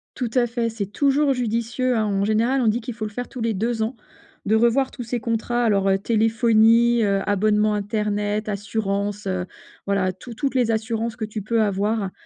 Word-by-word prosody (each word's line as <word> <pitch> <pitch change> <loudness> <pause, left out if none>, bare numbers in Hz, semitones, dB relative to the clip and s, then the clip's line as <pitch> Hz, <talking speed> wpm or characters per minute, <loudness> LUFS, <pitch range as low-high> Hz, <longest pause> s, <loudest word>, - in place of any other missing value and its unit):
Tout 245 -3 -2
à 240 -1 +3
fait, 230 0 -1
c'est 220 -3 -4
toujours 280 +6 +2
judicieux, 240 +1 -1
hein. 215 - +1
En 200 -1 0
général, 230 +5 +1
on 230 - +1
dit 230 +3 0
qu'il 235 +1 -6
faut 220 -1 -7
le 210 - -4
faire 245 +3 -5
tous 250 - -8
les 225 -1 0
2 225 +3 -1
ans 230 +3 -3 0.5
de 220 - +2
revoir 235 +4 +3
tous 245 - -7
ses 235 +1 -3
contrats. 230 +2 -1
Alors, 200 -3 +2
heu, 195 - +3
téléphonie, 225 +2 +3
heu, 200 -1 +2
abonnement 210 +1 +2
internet, 210 0 -1
assurance, 205 0 -2
heu, 185 -1 -1 0.4
voilà 195 -2 0
tout 230 +6 -11
toutes 270 +3 -2
les 240 -3 +2
assurances 225 +1 -2
que 220 - -3
tu 215 0 -6
peux 225 +2 0
avoir, 205 0 0
220 Hz, 200 wpm, -22 LUFS, 205-235 Hz, 0.5 s, à